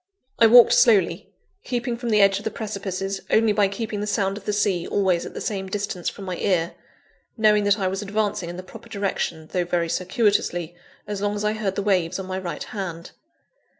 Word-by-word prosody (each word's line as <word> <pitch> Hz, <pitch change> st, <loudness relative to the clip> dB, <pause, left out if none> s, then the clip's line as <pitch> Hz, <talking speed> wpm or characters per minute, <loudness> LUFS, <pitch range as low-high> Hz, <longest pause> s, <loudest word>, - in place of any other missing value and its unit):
I 230 Hz, -, +8 dB
walked 240 Hz, +1 st, +8 dB
slowly, 205 Hz, -7 st, +3 dB, 0.3 s
keeping 240 Hz, -1 st, -2 dB
from 240 Hz, 0 st, -4 dB
the 210 Hz, -2 st, +4 dB
edge 195 Hz, 0 st, +4 dB
of -, -, -11 dB
the 220 Hz, -, -1 dB
precipices 195 Hz, -3 st, -4 dB
only 220 Hz, -1 st, +4 dB
by 205 Hz, -1 st, +3 dB
keeping 210 Hz, +1 st, -4 dB
the 210 Hz, -, -3 dB
sound 200 Hz, -2 st, 0 dB
of 205 Hz, -1 st, -10 dB
the -, -, 0 dB
sea 200 Hz, -4 st, 0 dB
always 185 Hz, -4 st, +1 dB
at -, -, -11 dB
the -, -, -5 dB
same 195 Hz, -2 st, -3 dB
distance 200 Hz, -3 st, -3 dB
from 200 Hz, -, -10 dB
my 180 Hz, -2 st, -4 dB
ear; 175 Hz, -4 st, 0 dB, 0.6 s
knowing 210 Hz, -2 st, +4 dB
that 205 Hz, +1 st, +3 dB
I 195 Hz, -3 st, 0 dB
was 190 Hz, +2 st, -2 dB
advancing 205 Hz, -3 st, -2 dB
in 175 Hz, -, -7 dB
the 185 Hz, -, -7 dB
proper 190 Hz, +5 st, -13 dB
direction, 190 Hz, -6 st, -3 dB
though 180 Hz, -, +1 dB
very 170 Hz, -1 st, -1 dB
circuitously, 180 Hz, -3 st, 0 dB, 0.3 s
as 205 Hz, -1 st, -5 dB
long 205 Hz, 0 st, 0 dB
as 205 Hz, -, -3 dB
I 210 Hz, -, +1 dB
heard 210 Hz, -3 st, -2 dB
the 200 Hz, -, -2 dB
waves 185 Hz, -5 st, +1 dB
on 190 Hz, -, -5 dB
my 185 Hz, 0 st, -4 dB
right 175 Hz, -2 st, -5 dB
hand. 175 Hz, -5 st, -6 dB
200 Hz, 215 wpm, -23 LUFS, 185-210 Hz, 0.6 s, I